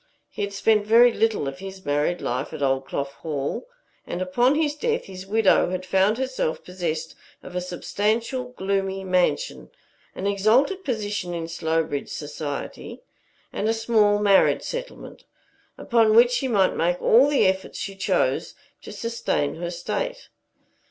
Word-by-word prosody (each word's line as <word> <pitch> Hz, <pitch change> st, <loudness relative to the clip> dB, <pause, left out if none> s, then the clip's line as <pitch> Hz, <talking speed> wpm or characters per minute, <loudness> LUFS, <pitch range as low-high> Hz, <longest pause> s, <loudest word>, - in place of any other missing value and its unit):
He -, -, -6 dB
had 200 Hz, 0 st, -2 dB
spent 210 Hz, +1 st, +2 dB
very 235 Hz, +2 st, +6 dB
little 220 Hz, -11 st, +1 dB
of 135 Hz, 0 st, -6 dB
his 190 Hz, -1 st, -9 dB
married 145 Hz, +5 st, 0 dB
life 130 Hz, +3 st, -3 dB
at 145 Hz, -, -4 dB
Oldclough 135 Hz, +1 st, -1 dB
Hall, 150 Hz, -, -4 dB, 0.4 s
and -, -, -4 dB
upon 240 Hz, +9 st, +2 dB
his 300 Hz, -1 st, +1 dB
death 460 Hz, +9 st, -1 dB
his 190 Hz, 0 st, -9 dB
widow 210 Hz, -3 st, +3 dB
had 185 Hz, 0 st, -4 dB
found 190 Hz, +4 st, +2 dB
herself 260 Hz, -11 st, -2 dB
possessed 175 Hz, -4 st, -4 dB, 0.3 s
of 180 Hz, -, -10 dB
a 180 Hz, -, -1 dB
substantial, 215 Hz, +7 st, -1 dB
gloomy 195 Hz, -4 st, -2 dB
mansion, 185 Hz, -, 0 dB, 0.5 s
an 190 Hz, -, -5 dB
exalted 225 Hz, -, +2 dB
position 210 Hz, -, -3 dB
in 165 Hz, -1 st, -4 dB
Slowbridge 160 Hz, -3 st, -2 dB
society, 145 Hz, -1 st, -6 dB, 0.5 s
and 215 Hz, -, -1 dB
a 225 Hz, -, +2 dB
small 220 Hz, -2 st, +3 dB
marriage 200 Hz, -2 st, +4 dB
settlement, -, -, -7 dB, 0.5 s
upon 225 Hz, -2 st, +3 dB
which 240 Hz, +1 st, +7 dB
she 255 Hz, +2 st, 0 dB
might 200 Hz, -6 st, +2 dB
make 175 Hz, +2 st, 0 dB
all 250 Hz, +5 st, +5 dB
the 290 Hz, -, +3 dB
efforts 190 Hz, 0 st, -1 dB
she 195 Hz, -, -5 dB
chose 195 Hz, -, 0 dB, 0.3 s
to -, -, -10 dB
sustain 230 Hz, -10 st, -2 dB
her 170 Hz, +1 st, -4 dB
state. -, -, -4 dB
195 Hz, 150 wpm, -24 LUFS, 175-230 Hz, 0.5 s, which